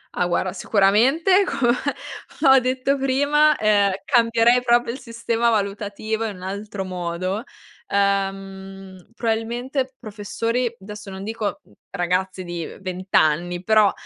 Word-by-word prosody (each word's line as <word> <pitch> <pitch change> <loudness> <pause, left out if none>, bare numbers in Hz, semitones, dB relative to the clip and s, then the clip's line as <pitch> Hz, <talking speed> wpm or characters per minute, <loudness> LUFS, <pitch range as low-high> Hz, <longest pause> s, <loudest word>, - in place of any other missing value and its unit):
Ah 180 - +1
guarda 180 +1 -1
sicuramente 260 - +3
come 270 -8 +1 0.8
ho 265 - +8
detto 255 +2 0
prima, 285 +3 +3
ehm, 205 -2 +3 0.2
cambierei 235 -1 +4
proprio 240 -1 +2
il 255 - -7
sistema 230 -1 -1
valutativo 210 +1 -2
in 210 -3 -4
un 180 - -12
altro 200 0 -5
modo. 185 +3 -3 0.4
Uhm, 195 -1 -2
probabilmente 245 +4 -2
professori, 230 +3 -2
adesso 210 0 -9
non 190 0 -7
dico, 215 -1 -4
mhmm, - - -26 0.2
ragazzi 185 +1 -1
di 175 -1 -5 0.2
20 185 0 -6
anni, 175 +3 +2
però, 215 -1 +4
210 Hz, 125 wpm, -22 LUFS, 190-240 Hz, 0.8 s, ho